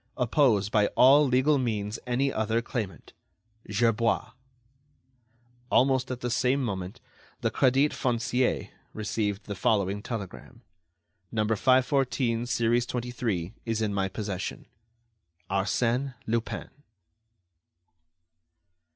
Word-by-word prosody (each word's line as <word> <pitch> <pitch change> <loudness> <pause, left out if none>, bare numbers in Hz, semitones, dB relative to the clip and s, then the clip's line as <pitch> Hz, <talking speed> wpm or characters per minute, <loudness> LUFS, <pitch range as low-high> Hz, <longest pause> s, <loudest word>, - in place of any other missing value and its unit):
Oppose 120 -5 +3
by 105 -1 +3
all 140 +3 +7
legal 130 +3 +3
means 110 -3 -2
any 135 +3 +1
other 110 +1 0
claimant. 115 -4 -5 0.6
"GERBOIS." 115 +2 +1 1.4
Almost 130 0 +3
at 130 -1 -5
the 120 - -2
same 130 +3 +1
moment, 95 -4 -4 0.4
the - - 0
Crédit 135 +3 +3
Foncier 125 0 0 0.2
received 105 -1 -2
the 105 - -5
following 100 0 0
telegram: 105 -5 -7 0.7
"No. 110 -2 0
514, 125 +1 +2
series 120 0 +1
23, 115 -7 -3
is 115 -1 -2
in 110 -2 -1
my 95 -1 0
possession. 100 -1 -5 0.9
"ARSÈNE 120 +7 0
LUPIN." 115 +1 -3
115 Hz, 100 wpm, -27 LUFS, 105-125 Hz, 1.4 s, all